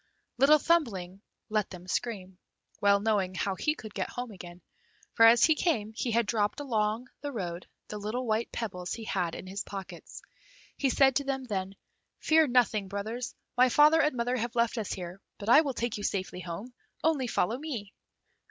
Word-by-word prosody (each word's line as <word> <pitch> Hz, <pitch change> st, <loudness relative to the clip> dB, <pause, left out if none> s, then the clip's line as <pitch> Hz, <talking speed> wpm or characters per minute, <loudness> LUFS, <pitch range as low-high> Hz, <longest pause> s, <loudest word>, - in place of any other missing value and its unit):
Little 285 Hz, +3 st, +7 dB
Thumbling 205 Hz, -, 0 dB, 0.3 s
let 215 Hz, -1 st, 0 dB
them 180 Hz, -1 st, -11 dB
scream, 190 Hz, -3 st, -3 dB, 0.4 s
well 200 Hz, 0 st, +5 dB
knowing 200 Hz, -3 st, 0 dB
how 195 Hz, +1 st, -1 dB
he 300 Hz, +10 st, 0 dB
could 215 Hz, -7 st, -10 dB
get 190 Hz, -, -3 dB
home 245 Hz, -1 st, -5 dB
again, 180 Hz, -2 st, -11 dB, 0.5 s
for 225 Hz, -1 st, +7 dB
as 235 Hz, +1 st, +6 dB
he 320 Hz, -, +6 dB
came 225 Hz, -, -1 dB
he 235 Hz, -, -2 dB
had 230 Hz, 0 st, +2 dB
dropped 210 Hz, +1 st, 0 dB
all 290 Hz, -, -5 dB
along 220 Hz, 0 st, 0 dB
the 290 Hz, 0 st, -4 dB
road 180 Hz, -7 st, -5 dB, 0.2 s
the 210 Hz, -, -5 dB
little 220 Hz, +5 st, -3 dB
white 220 Hz, 0 st, -1 dB
pebbles 180 Hz, -6 st, -4 dB
he 230 Hz, -, -6 dB
had 180 Hz, -6 st, -2 dB
in -, -, -8 dB
his 195 Hz, +2 st, -5 dB
pockets. 190 Hz, -3 st, -9 dB, 0.5 s
He 275 Hz, -, +1 dB
said 270 Hz, 0 st, +4 dB
to 285 Hz, -, -1 dB
them 270 Hz, -1 st, -2 dB
then, 195 Hz, -5 st, -4 dB, 0.4 s
"Fear 320 Hz, -1 st, +4 dB
nothing, 235 Hz, -5 st, +2 dB
brothers, 215 Hz, +5 st, -4 dB, 0.2 s
my 255 Hz, +1 st, +5 dB
father 300 Hz, +5 st, +6 dB
and 300 Hz, -4 st, +1 dB
mother 245 Hz, +2 st, 0 dB
have 235 Hz, 0 st, -3 dB
left 235 Hz, 0 st, +1 dB
us 210 Hz, -, -4 dB
here, 180 Hz, +1 st, -6 dB, 0.2 s
but 205 Hz, +1 st, -5 dB
I 285 Hz, +6 st, +8 dB
will 275 Hz, -5 st, -3 dB
take 235 Hz, -2 st, -2 dB
you 205 Hz, -, -6 dB
safely 190 Hz, -2 st, -2 dB
home, 185 Hz, +8 st, -7 dB, 0.3 s
only 300 Hz, -5 st, +2 dB
follow 230 Hz, +2 st, 0 dB
me." 240 Hz, -10 st, -6 dB
220 Hz, 190 wpm, -29 LUFS, 195-255 Hz, 0.5 s, I